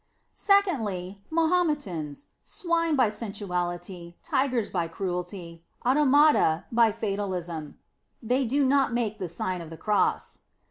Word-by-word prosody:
Second, 395 - +3
the 185 -1 -5
Mahometans: 300 - 0 0.2
swine 335 -2 0
by 250 -6 +3
sensu 210 -1 -6
ality, 175 0 -4
tigers 255 -5 0
by 170 -3 -1
cruelty, 175 -1 -5 0.2
automata, 285 - +4
by 230 -1 +4
fatalism, 190 -7 -4 0.4
they 250 +3 0
do 270 +4 +1
not 270 -1 +3
make 220 -3 -1
the 185 - -3
Sign 180 +2 -3
of 165 - -9
the 165 - -9
Cross. 210 +4 0
210 Hz, 125 wpm, -27 LUFS, 175-275 Hz, 0.4 s, automata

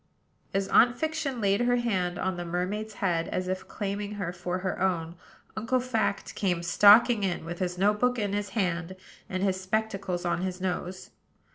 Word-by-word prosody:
As 195 0 0
Aunt 240 +1 +5
Fiction 315 -4 -2
laid 200 +1 +2
her 245 0 +3
hand 190 -7 0
on 190 -1 -1
the 175 - -4
mermaid's 190 +5 -3
head, 170 -4 0
as 185 0 -2
if 185 0 -3
claiming 205 0 -4
her 185 -4 -3
for 175 +1 -3
her 185 -1 -3
own, 170 -3 0 0.4
Uncle 230 +4 0
Fact 225 -5 -1
came 175 -4 -1
stalking 210 +6 +6
in, 175 -4 -1
with 170 +1 -6
his 180 -1 -2
note 205 +3 +2
book 250 +1 +2
in 205 -3 -1
his 205 0 -2
hand, 180 -2 -1 0.3
and 185 0 -2
his 190 -1 0
spectacles 195 -3 -2
on 175 0 0
his 185 0 -3
nose. 185 0 -4
190 Hz, 180 wpm, -28 LUFS, 180-215 Hz, 0.4 s, stalking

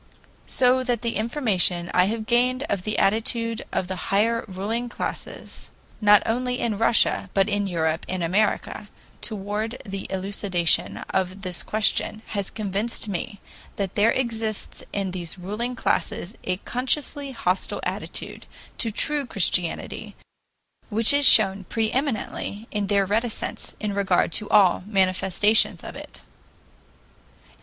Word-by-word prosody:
So 255 0 +4
that 245 -3 -1
the 235 -1 -1
information 205 -7 +2
I 180 - +4
have 220 +2 -2
gained 250 +3 +2
of 200 - 0
the 215 +3 -3
attitude 225 +2 0
of 185 - -1
the 190 - -3
higher 225 +4 +2
ruling 215 +6 -3
classes, - - -6 0.3
not 210 -1 +6
only 250 +2 -1
in 220 -4 -2
Russia 225 -3 +2
but 195 0 +3
in 205 -1 0
Europe 160 -2 -1
and 185 -1 -2
America, 205 +3 0 0.3
toward 215 +2 -3
the 195 -1 -6
elucidation 190 -2 0
of 190 +1 -2
this 180 -2 -2
question 215 0 0
has 200 -2 -2
convinced 215 +2 -1
me 200 +2 -5 0.3
that 195 -2 -3
there 215 +2 +4
exists 225 -4 -2
in 195 -2 -2
these 175 -1 -5
ruling 210 +7 -4
classes 210 -3 -1
a 185 0 -1
consciously 275 - -2
hostile 195 -7 -2
attitude - - -5 0.3
to 230 - 0
true 285 +5 +1
Christianity, 180 -4 -1 0.7
which 225 +3 +6
is 285 -1 +4
shown 195 -2 +6
pre 220 +3 0
eminently 230 -5 -3
in 205 -1 -2
their 200 -1 +2
reticence 220 +1 -2
in 210 -1 -2
regard 190 -4 +2
to 210 - 0
all 190 -3 +4
manifestations 190 +1 +2
of - - -8
it. - - -9
210 Hz, 135 wpm, -24 LUFS, 190-230 Hz, 0.7 s, not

